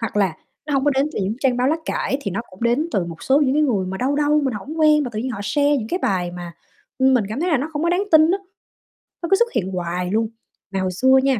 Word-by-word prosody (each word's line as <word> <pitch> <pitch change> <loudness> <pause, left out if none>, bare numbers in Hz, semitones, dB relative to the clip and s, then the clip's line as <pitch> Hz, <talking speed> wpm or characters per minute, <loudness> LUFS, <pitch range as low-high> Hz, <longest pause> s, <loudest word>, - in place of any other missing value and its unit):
hoặc 225 -2 -4
là 190 -5 +2 0.3
nó 290 - -1
hông 270 +1 +1
có 290 - +4
đến 270 +1 +1
từ - - -3
những 200 +4 -1
trang 255 -3 +2
báo 250 +1 +1
lá 310 - +2
cải 270 - -1
thì 200 - -4
nó 195 - -2
cũng 185 +4 -13
đến 250 +8 +1
từ 190 - +1
một 165 -1 -9
số 275 +2 +3
những 270 -2 +2
cái 305 - +3
người 210 -10 +1
mà 190 +1 -4
đâu 270 +5 0
đâu, 300 0 +3
mình 260 - -1
hổng 300 +11 -6
quen 305 -1 +5
mà 245 - -4
tự 215 - -4
nhiên 255 +4 -2
họ 215 - -5
share 285 +8 +2
những 225 -4 -4
cái 360 - -1
bài 180 -3 0
mà, 175 -1 -8 0.5
ừm, 265 0 +4
mình 230 -5 +2
cảm 225 +7 -4
thấy 355 +2 0
là 310 - +4
nó 285 +5 -3
không 295 0 -2
có 340 - +1
đáng 360 +3 +1
tin 315 +1 +7
á, 390 - +1 0.8
nó 340 - -3
cứ - - +7
xuất 475 0 +1
hiện 190 -2 -1
hoài 180 0 -3
luôn. 220 +1 +1 0.4
Mà 195 - -2
hồi 185 -1 -1
xưa 260 +8 +4
nha, 270 -4 +2
255 Hz, 305 wpm, -21 LUFS, 195-295 Hz, 0.8 s, tin